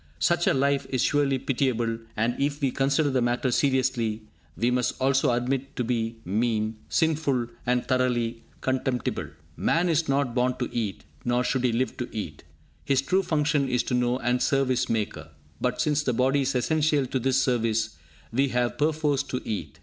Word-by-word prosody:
Such 170 - +2
a - - +5
life 140 0 +1
is 130 -2 0
surely 145 -2 +2
pitiable, 120 -4 0 0.2
and 115 +3 +1
if 140 +1 0
we 135 -4 +1
consider 140 +2 +1
the 130 -1 +1
matter 120 +2 +1
seriously, 125 -5 +1 0.3
we 120 +1 +1
must 125 -1 0
also 135 +1 +3
admit 125 +2 0
it 135 - -22
to 125 - -1
be 115 -1 -1
mean, 110 +2 0
sinful 150 -6 +1 0.2
and 125 0 +1
thoroughly 120 -3 0 0.2
contemptible. 130 -1 -1 0.3
Man 170 +2 +1
is 160 -1 +1
not 135 -3 +1
born 125 0 +1
to 125 - -2
eat, 110 -5 -2 0.2
nor 120 +1 +1
should 130 0 0
he 125 - +3
live 125 +3 -1
to 125 -3 -4
eat. 85 -9 -6 0.4
His 135 -1 +2
true 185 +7 +2
function 150 -5 +1
is 125 -1 +1
to - - -3
know 125 0 +2
and 125 -1 0
serve 135 -1 +2
his 130 0 +1
Maker; 110 -2 -2 0.3
but, - - 0
since 150 0 +2
the 130 -4 0
body 130 +4 +2
is 135 0 -1
essential 150 +2 +2
to 130 +1 -2
this 130 +1 +2
service, 115 -5 0 0.4
we 135 +4 +3
have 125 0 -1
perforce 150 -2 +1
to 135 -3 -4
eat. 105 - -4
130 Hz, 185 wpm, -26 LUFS, 120-140 Hz, 0.4 s, a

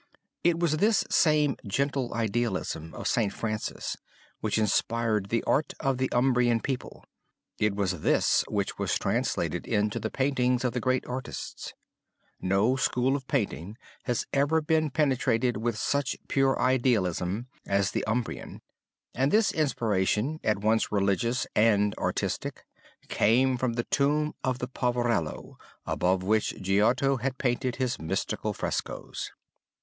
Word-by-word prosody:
It 170 -1 +3
was 165 -3 +1
this 210 +5 +3
same 150 -4 +3
gentle 135 +4 -1
idealism 105 -8 -2
of - - -4
St. 110 -4 +1
Francis 110 +1 -4 0.4
which 110 0 -1
inspired 110 -1 +1
the 115 +1 0
art 150 - +1
of 135 -1 0
the 130 - +1
Umbrian 120 -2 +3
people; 130 +2 -5 0.5
it 105 -1 +1
was 95 -5 -1
this - - +3
which - - -2
was - - +1
translated - - -1
into 105 0 0
the 110 - -3
paintings 125 -2 +1
of 125 -2 0
the 125 - -1
greatest 130 +1 0
artists. 125 +1 -6 0.7
No 100 +7 +2
school 130 0 +1
of 135 -2 -5
painting 105 - -2 0.3
has 120 -3 -1
ever 145 +3 +3
been 155 0 +1
penetrated 130 -5 +1
with 115 0 -1
such 140 +5 0
pure 135 -1 +2
idealism 115 -5 +1 0.2
as 100 -1 +1
the - - -1
Umbrian; 110 +2 -3 0.5
and 135 +3 +1
this 220 0 +4
inspiration, 115 -1 0
at 105 -2 +2
once 110 +2 +1
religious 105 +5 +1
and 105 -2 +4
artistic, - - -2 0.4
came 130 +4 +3
from 125 -1 -1
the 120 0 -1
tomb 150 +3 +1
of 130 -1 0
the 125 - -4
poverello 120 - -1 0.3
above 90 +1 +1
which 110 +3 +1
Giotto 110 +8 +2
had 130 +2 -2
painted 125 -1 0
his 125 -1 -1
mystical 90 +4 -2
frescoes. - - -4
120 Hz, 135 wpm, -28 LUFS, 105-135 Hz, 0.7 s, this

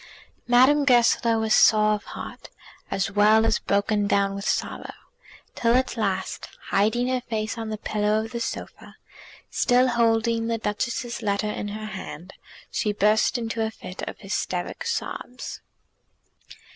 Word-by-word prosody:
Madame 260 +4 +5
Goesler 240 -3 +4
was 220 -1 +1
sore 215 -1 +5
of 210 - -3
heart, - - -9 0.4
as 195 0 -1
well 215 +2 +5
as 225 - +2
broken 205 +1 +1
down 200 -1 +2
with 200 0 -5
sorrow, - - -3 0.6
till 235 0 +2
at 255 +1 +1
last, 195 -4 -2 0.2
hiding 220 +5 +2
her 255 -1 0
face 220 -2 -3
on 225 -1 -5
the 215 - -3
pillow 210 0 0
of 225 - -10
the 235 - -4
sofa, 235 - -6 0.6
still 250 0 +3
holding 230 -1 +2
the 230 0 0
Duchess's 235 +3 -3
letter 210 0 0
in 205 - -4
her 215 +1 -6
hand, 190 -3 -8 0.4
she 210 - 0
burst 210 +4 +3
into 230 -1 -3
a 220 - 0
fit 185 -4 -9
of - - -9
hysteric 190 - -3
sobs. 260 - -5
220 Hz, 145 wpm, -25 LUFS, 205-235 Hz, 0.6 s, Madame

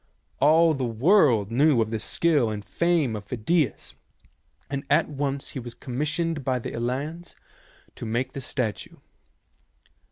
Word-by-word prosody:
All 160 +3 +5
the 135 -3 -3
world 120 - +3
knew 140 +2 +4
of 110 -1 0
the 110 - -2
skill 145 0 +1
and 105 -1 -5
the - - -31
fame 170 -9 +1
of 105 -1 -7
Phidias, 125 +5 -1 0.7
and 140 0 -4
at - - +3
once 140 -1 -3
he - - -6
was 120 -1 -8
commissioned 150 +4 -2
by 130 0 0
the 120 - -5
Elians 140 +9 -4 0.6
to - - -6
make 125 +4 -2
the 135 - -5
statue. 125 -5 -3
135 Hz, 150 wpm, -25 LUFS, 115-155 Hz, 0.7 s, All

